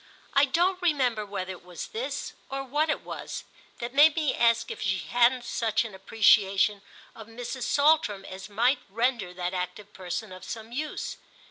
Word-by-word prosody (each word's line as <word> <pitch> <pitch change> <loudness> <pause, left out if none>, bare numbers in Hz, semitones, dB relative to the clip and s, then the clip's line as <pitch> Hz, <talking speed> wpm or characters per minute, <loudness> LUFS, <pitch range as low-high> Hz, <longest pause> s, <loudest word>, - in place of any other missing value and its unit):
I 280 0 +6
don't 360 +6 +1
remember 255 -11 +1
whether 190 -2 -4
it 180 - -10
was 180 -1 -7
this, 460 +3 -4 0.2
or 270 0 -3
what 295 +4 0
it 300 - 0
was, - - -6 0.3
that 240 +1 -5
made 295 +2 +7
me 310 -4 +1
ask 235 0 +2
if - - -7
she 190 -2 +1
hadn't 245 +4 +2
such 230 -1 0
an 220 - -8
appreciation 200 0 +3 0.3
of 220 -2 -11
Mrs. 245 +2 -5
Saltram 285 -10 +3
as 190 +2 -8
might 240 +7 +2
render 230 -3 0
that 180 0 -3
active 185 +3 -5
person 185 +3 -5
of 185 0 -10
some 220 +3 -7
use. 300 +5 -4
230 Hz, 170 wpm, -27 LUFS, 195-270 Hz, 0.3 s, made